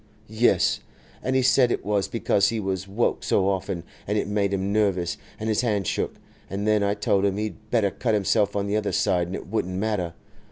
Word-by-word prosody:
'Yes. 110 +3 +2 0.4
And 130 - -1
he 130 - +3
said 125 -1 +4
it - - -2
was 100 -1 +1
because 100 -3 +2
he 115 - -2
was 95 -2 -2
woke 105 +5 0
so 95 - +2
often, 95 -2 -1 0.2
and 105 +2 0
it - - 0
made 100 -1 0
him 100 0 -1
nervous, 95 -5 +1 0.2
and 110 - -3
his 110 0 +2
hand 105 -5 0
shook. - - -1 0.3
And 100 +2 -3
then 105 -1 +3
I 100 0 +1
told 100 -1 +1
him 100 -1 +1
he'd 110 0 -5
better 110 -5 +2
cut 115 0 0
himself 100 0 +2
on 100 -1 0
the 100 +1 -1
other 105 -1 0
side, 90 -4 +2
and 90 - -4
it - - -6
wouldn't 95 -4 -2
matter. 95 -5 -1
100 Hz, 215 wpm, -25 LUFS, 95-110 Hz, 0.4 s, said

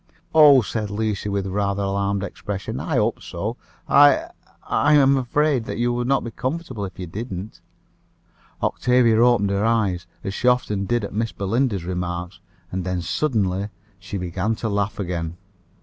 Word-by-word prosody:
"Oh!" 145 -5 +8
said 105 -1 -3
Lucia, 105 -1 -2
with 100 -1 -1
a 95 - -4
rather 100 0 0
alarmed 100 0 -1
expression, 100 0 -5
"I - - -2
hope - - +1
so. 105 +7 -4 0.3
I 145 -1 +5 0.3
I 150 - +2
am 140 -1 +5
afraid 135 -1 +1
you 120 +1 0
would 120 0 -1
not 135 +1 +2
be 115 - -5
comfortable 130 -5 -4
if 95 - -9
you 90 - -5
didn't." 100 +2 -7 1.0
Octavia 120 -2 +3
opened 120 -5 +3
her 100 +1 0
eyes, 100 -6 +1 0.2
as 95 -2 -3
she 125 - -1
often 105 -5 +2
did 120 -2 0
at 100 - -5
Miss 115 +1 -1
Belinda's 100 -1 -1
remarks, 90 0 -4 0.3
and 95 0 -2
then 90 0 -2
suddenly 100 - 0 0.3
she 100 +2 -6
began 95 +4 -2
to 110 - -3
laugh 100 0 -1
again. 85 -3 -3
105 Hz, 165 wpm, -22 LUFS, 95-120 Hz, 1.0 s, Oh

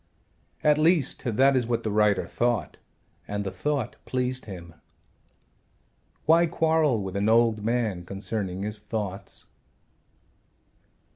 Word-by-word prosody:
At 150 0 +4
least 160 -3 +2
that 130 +4 +3
is 125 -3 +1
what 115 -1 -1
the 110 - -1
writer 105 -1 +3
thought 120 -2 -1 0.5
and 105 0 -2
the 95 - -4
thought 145 -2 -2
pleased 130 0 -2
him. 85 -5 -9 1.5
Why 165 +2 +5
quarrel 160 - +2
with 95 0 -6
an 100 +2 +1
old 115 -2 +3
man 110 -6 0
concerning 95 0 -4
his 105 0 -4
thoughts? 100 -3 -5
115 Hz, 120 wpm, -26 LUFS, 100-130 Hz, 1.5 s, Why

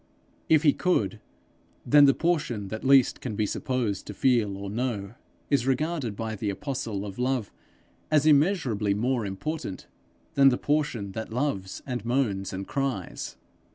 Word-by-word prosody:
If 155 -1 +5
he 145 -3 +5
could, 115 - 0 0.7
then 145 0 +7
the 135 - +5
portion 135 - -1
that 110 +1 -5
least 135 -2 +4
can 120 -5 -4
be 105 - +1
supposed 115 -3 -2
to 105 - -7
feel 110 -5 +2
or 100 0 -6
know, 105 -2 -3 0.4
is 135 -3 +2
regarded 135 -4 -1
by 110 +1 -4
the 105 0 -3
apostle 110 -3 -3
of 100 +2 -8
love 125 -4 0 0.6
as 150 -1 +3
immeasurably 140 - +3
more 120 0 0
important 100 +2 -5 0.5
than 135 -1 +6
the 125 - +1
portion 145 -9 -1
that 110 +3 -6
loves 115 -7 -2
and 125 -5 -4
moans 115 -6 0
and 95 +1 -5
cries. 135 - -3
120 Hz, 155 wpm, -27 LUFS, 100-140 Hz, 0.7 s, then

